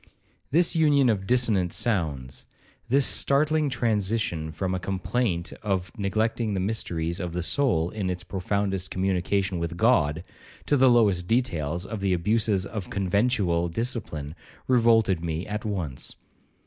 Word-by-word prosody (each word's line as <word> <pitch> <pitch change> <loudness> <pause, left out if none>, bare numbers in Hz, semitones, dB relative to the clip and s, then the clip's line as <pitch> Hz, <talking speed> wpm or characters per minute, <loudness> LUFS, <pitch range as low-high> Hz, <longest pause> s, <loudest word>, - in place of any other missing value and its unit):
This 170 +4 +3
union 145 -5 +4
of 95 -4 -1
dissonant 110 -8 +2
sounds,—this 80 - -2
startling 150 +2 +2
transition 105 -9 -1
from 95 +3 -2
a 95 - -1
complaint 95 -1 -2
of 95 -3 -2
neglecting 110 +1 -1
the - - 0
mysteries 85 -4 -2
of 90 -3 -4
the 90 0 -2
soul 90 - +1
in 100 -4 -3
its 90 -1 -3
profoundest 95 0 -2
communion 95 0 0
with 85 +1 -4
God, 85 -8 +2 0.4
to 145 - +2
the 130 -1 +5
lowest 100 -7 +3
details 85 - 0
of 110 +1 -5
the 95 -1 +1
abuses 105 +2 +1
of 105 -3 -6
conventual 100 -3 +1
discipline, 85 - -4 0.3
revolted 115 -8 +3
me 80 +1 -3
at 105 +1 -4
once. 90 -11 -3
100 Hz, 135 wpm, -26 LUFS, 85-115 Hz, 0.4 s, the